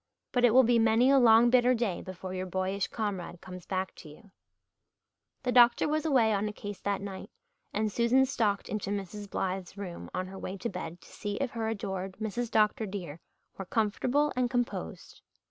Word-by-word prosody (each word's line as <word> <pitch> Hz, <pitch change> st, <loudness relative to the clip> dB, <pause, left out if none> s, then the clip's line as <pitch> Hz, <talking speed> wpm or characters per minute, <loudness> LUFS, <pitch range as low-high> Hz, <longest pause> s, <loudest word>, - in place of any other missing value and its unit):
But 245 Hz, -, +1 dB
it 245 Hz, -, +6 dB
will 260 Hz, -, +8 dB
be 235 Hz, 0 st, +4 dB
many 225 Hz, +4 st, +4 dB
a 275 Hz, -, +6 dB
long 235 Hz, 0 st, +6 dB
bitter 250 Hz, 0 st, +5 dB
day 225 Hz, -7 st, -1 dB
before 185 Hz, 0 st, -7 dB
your 185 Hz, 0 st, -3 dB
boyish 190 Hz, +1 st, -1 dB
comrade 195 Hz, -6 st, -4 dB
comes 180 Hz, -1 st, -10 dB
back 190 Hz, 0 st, -2 dB
to 155 Hz, -, -11 dB
you. 190 Hz, +7 st, -16 dB, 1.1 s
The 250 Hz, -, 0 dB
doctor 240 Hz, +2 st, +6 dB
was 310 Hz, +1 st, 0 dB
away 235 Hz, -7 st, +4 dB
on 205 Hz, +1 st, 0 dB
a -, -, -3 dB
case 205 Hz, -1 st, -7 dB
that 200 Hz, -1 st, -2 dB
night 195 Hz, -2 st, -7 dB, 0.4 s
and 215 Hz, 0 st, -1 dB
Susan 240 Hz, +4 st, +3 dB
stalked 215 Hz, -6 st, 0 dB
into 205 Hz, -1 st, -3 dB
Mrs. 205 Hz, 0 st, -5 dB
Blythe's 190 Hz, 0 st, -3 dB
room 185 Hz, -4 st, -7 dB
on 185 Hz, 0 st, -3 dB
her 190 Hz, +1 st, -9 dB
way 190 Hz, -, -5 dB
to 235 Hz, -, -3 dB
bed 170 Hz, -3 st, -7 dB
to -, -, -16 dB
see 205 Hz, -1 st, -4 dB
if 275 Hz, +1 st, -2 dB
her 225 Hz, -2 st, -3 dB
adored 195 Hz, -3 st, -3 dB
Mrs. 230 Hz, +2 st, -3 dB
Dr. 215 Hz, 0 st, +2 dB
dear 175 Hz, -6 st, -6 dB, 0.4 s
were 195 Hz, -, -4 dB
"comfortable 245 Hz, +8 st, +1 dB
and 250 Hz, -1 st, +1 dB
composed." 245 Hz, -, -4 dB
210 Hz, 195 wpm, -29 LUFS, 190-240 Hz, 1.1 s, will